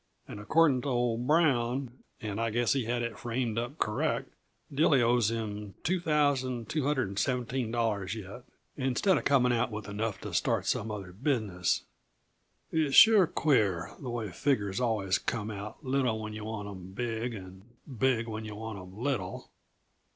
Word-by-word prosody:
And - - -8
accordin' 140 +4 +3
to 145 - -5
old 120 -1 0
Brown 130 -5 +2 0.2
and 105 -1 -3
I 115 - +1
guess 120 +2 +2
he 135 -4 0
had 120 +1 -1
it 120 -1 -4
framed 120 -1 -1
up 120 +6 -5
correct 105 -7 -1 0.4
Dilly 140 -1 +4
owes 120 -2 +3
him 105 -3 -4
$2,217 130 - 0
yet, 105 +3 -8 0.3
instead 140 +6 +2
uh - - -5
coming 125 -3 +3
out 120 0 +1
with 105 -2 -6
enough 105 0 -3
to - - -6
start - - +1
some 110 - 0
other 100 -4 -6
business. 100 - 0 0.9
It's 155 -4 +1
sure 215 -5 +8
queer, 100 - +1
the 130 - -6
way 115 -5 -3
figures 100 - 0
always 105 -6 +1
come 110 -2 -3
out 105 +8 -8
little 130 -4 +1
when 110 0 -5
yuh 105 0 -6
want 110 -2 -5
'em 95 -2 -9
big, 115 +1 -2
and 95 -1 -10 0.2
big 125 -3 0
when 110 0 -5
yuh 105 -1 -7
want 110 -1 -6
'em 90 +1 -11
little! 120 -7 -3
115 Hz, 155 wpm, -30 LUFS, 105-130 Hz, 0.9 s, sure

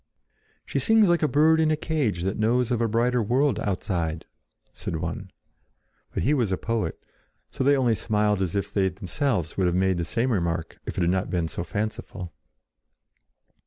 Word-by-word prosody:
"She - - -1
sings 225 -2 +4
like 175 -1 +3
a 155 - +3
bird 155 +3 +4
in 160 -1 +3
a 155 - +3
cage 145 - -1
that 95 +2 -2
knows 120 +3 +2
of 120 -1 +1
a 115 - +2
brighter 120 +2 +1
world 125 +3 +1
outside," 85 -5 -2 0.5
said - - -4
one. - - -4 0.8
But - - -2
he 145 - +3
was 120 -9 +1
a 95 - +1
poet, 110 -7 -2 0.5
so - - -2
they 140 +1 +4
only 125 -3 +3
smiled 105 -1 0
as 90 -2 -1
if 100 - -2
they 95 -2 +2
themselves 95 - -2
would 95 -2 +2
have 90 - +1
made 95 0 +2
the 85 - -1
same 125 +6 0
remark 85 -5 -2
if - - -5
it - - +1
had 85 0 +3
not 95 0 -1
been 85 -3 0
so 85 - -4
fanciful. 100 -3 -5
105 Hz, 190 wpm, -25 LUFS, 90-130 Hz, 0.8 s, sings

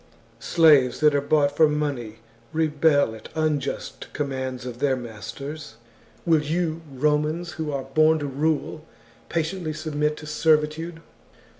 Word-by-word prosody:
Slaves 150 -7 +4
that 150 -1 +5
are 145 - +2
bought 145 0 +2
for 155 0 +5
money 135 -7 -3 0.3
rebel 150 -5 +2
at 110 - -11
unjust 155 -3 -2
com 145 -1 -2
mands 130 -1 -4
of 125 -1 -7
their 140 -1 +2
masters: 130 +4 -8 0.5
will 160 -3 +4
you, 160 +1 -1
Romans, 150 +5 0
who 160 -2 -4
are 140 -2 -3
born 155 +4 +3
to 145 - -4
rule, 150 +2 -1 0.5
patiently 165 0 -2
submit 150 -1 -1
to 155 - -9
servitude? 155 +2 +1
150 Hz, 135 wpm, -24 LUFS, 140-160 Hz, 0.5 s, that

